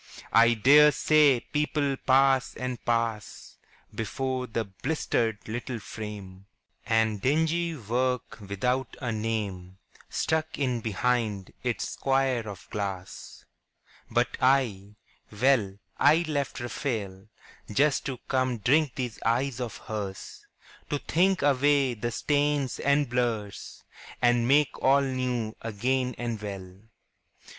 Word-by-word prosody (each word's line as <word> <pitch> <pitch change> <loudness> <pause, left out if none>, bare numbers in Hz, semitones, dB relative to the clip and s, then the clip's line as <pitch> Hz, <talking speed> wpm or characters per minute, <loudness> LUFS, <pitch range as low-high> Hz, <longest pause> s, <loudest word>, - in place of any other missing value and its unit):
I 115 +1 +6
dare 145 +7 +7
say 150 -3 +4
people 150 -2 -1
pass 135 0 +3
and 125 -2 -5
pass 115 -3 -2 0.4
Before 130 +2 -3
the 115 0 -2
blistered 110 0 -2
little 120 +2 -4
frame, 100 -3 -8 0.4
And 110 -2 +1
dingy 160 +5 +1
work 125 +1 -2
without 115 +6 -2
a 125 -4 -2
name 105 -5 -3 0.3
Stuck 160 0 -1
in 125 -4 -1
behind 110 -2 -1
its 125 -2 -2
square 135 -4 0
of 100 -2 -9
glass. 95 -3 -6 0.6
But - - 0
I, 115 -7 +1 0.4
well, 110 -3 +2 0.2
I 155 +4 +5
left 145 -3 -2
Raphael 110 -6 -4 0.4
Just 140 +6 +2
to 130 -2 -3
come 130 -2 0
drink 140 +5 +2
these 125 -4 -4
eyes 120 +2 0
of 120 -3 -4
hers, 100 -4 -6 0.4
To 145 - 0
think 185 +6 +1
away 140 -1 +3
the 120 +1 -3
stains 145 +2 0
and 140 0 +2
blurs 115 -4 -3 0.4
And 120 -1 +3
make 145 +1 +3
all 135 +1 +5
new 125 -4 -2
again 125 +3 -1
and 115 -3 -4
well. 95 -2 -7
125 Hz, 115 wpm, -27 LUFS, 110-135 Hz, 0.6 s, dare